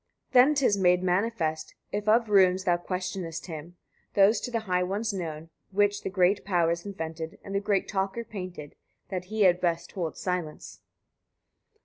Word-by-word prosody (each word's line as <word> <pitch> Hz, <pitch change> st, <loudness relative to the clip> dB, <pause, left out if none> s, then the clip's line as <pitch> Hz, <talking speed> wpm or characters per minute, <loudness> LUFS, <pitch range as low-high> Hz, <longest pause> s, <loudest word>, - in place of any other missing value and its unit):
80. -, -, -36 dB
Then 260 Hz, +4 st, +6 dB
'tis 255 Hz, -8 st, +3 dB
made 180 Hz, -1 st, +4 dB
manifest, 180 Hz, -4 st, -1 dB, 0.2 s
if 210 Hz, +1 st, -1 dB
of 230 Hz, +1 st, +4 dB
runes 190 Hz, -2 st, +4 dB
thou 175 Hz, -2 st, +3 dB
questionest 180 Hz, -1 st, -4 dB
him, 165 Hz, +1 st, -8 dB, 0.4 s
those 200 Hz, +3 st, +5 dB
to -, -, -4 dB
the 230 Hz, -2 st, -1 dB
high 180 Hz, -4 st, 0 dB
ones 200 Hz, +4 st, -1 dB
known, 165 Hz, -3 st, -5 dB, 0.2 s
which 205 Hz, +1 st, +1 dB
the -, -, -3 dB
great 190 Hz, +1 st, +2 dB
powers 170 Hz, -1 st, 0 dB
invented, 165 Hz, -2 st, -6 dB
and 195 Hz, -, -7 dB
the 200 Hz, -, +2 dB
great 200 Hz, -1 st, 0 dB
talker 195 Hz, +4 st, -2 dB
painted, 185 Hz, -9 st, -8 dB, 0.4 s
that 185 Hz, -2 st, -4 dB
he 215 Hz, +2 st, 0 dB
had 180 Hz, -1 st, +4 dB
best 170 Hz, -1 st, -1 dB
hold 170 Hz, -4 st, -4 dB
silence. 180 Hz, -4 st, -4 dB
185 Hz, 165 wpm, -27 LUFS, 175-205 Hz, 0.4 s, Then